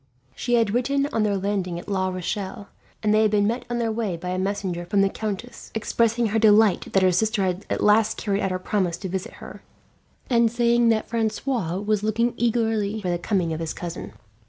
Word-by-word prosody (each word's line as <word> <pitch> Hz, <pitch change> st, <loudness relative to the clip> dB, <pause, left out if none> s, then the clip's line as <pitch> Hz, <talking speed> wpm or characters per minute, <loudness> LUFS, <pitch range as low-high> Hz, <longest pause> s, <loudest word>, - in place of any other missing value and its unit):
She 240 Hz, -, 0 dB
had 225 Hz, -3 st, +2 dB
written 275 Hz, +3 st, +1 dB
on 215 Hz, -, +2 dB
her 200 Hz, -1 st, +1 dB
landing 190 Hz, -3 st, -2 dB
at 175 Hz, -, -9 dB
La 190 Hz, -2 st, 0 dB
Rochelle, 190 Hz, +2 st, -4 dB, 0.3 s
and 210 Hz, 0 st, +3 dB
they 215 Hz, -, +4 dB
had 215 Hz, -, +4 dB
been 205 Hz, -1 st, +2 dB
met 235 Hz, +4 st, -1 dB
on 240 Hz, -, -1 dB
their 230 Hz, -1 st, 0 dB
way 215 Hz, -6 st, -2 dB
by 180 Hz, +2 st, -6 dB
a 185 Hz, 0 st, -1 dB
messenger 190 Hz, -2 st, -2 dB
from 195 Hz, +3 st, +1 dB
the 195 Hz, -, +3 dB
countess, 220 Hz, +4 st, -6 dB
expressing 230 Hz, +1 st, +1 dB
her 220 Hz, +2 st, +1 dB
delight 215 Hz, -2 st, +4 dB
that 195 Hz, -, +4 dB
her 185 Hz, -, +5 dB
sister 215 Hz, +3 st, +1 dB
had 185 Hz, +1 st, -2 dB
at -, -, -1 dB
last 215 Hz, +1 st, +4 dB
carried 200 Hz, -2 st, -1 dB
out 195 Hz, -, 0 dB
her 185 Hz, -, -1 dB
promise 185 Hz, -2 st, -1 dB
to 190 Hz, -, -6 dB
visit 185 Hz, 0 st, -4 dB
her, -, -, -11 dB, 0.7 s
and 235 Hz, -2 st, +3 dB
saying 235 Hz, 0 st, +3 dB
that 220 Hz, -1 st, +1 dB
Francois 225 Hz, -4 st, -1 dB
was 210 Hz, +1 st, 0 dB
looking 225 Hz, +3 st, +1 dB
eagerly 220 Hz, -3 st, 0 dB
for 185 Hz, -4 st, -2 dB
the 175 Hz, -, -1 dB
coming 175 Hz, -2 st, 0 dB
of 160 Hz, -, -4 dB
his 165 Hz, -1 st, -3 dB
cousin. 175 Hz, -1 st, -6 dB
210 Hz, 215 wpm, -24 LUFS, 185-225 Hz, 0.7 s, her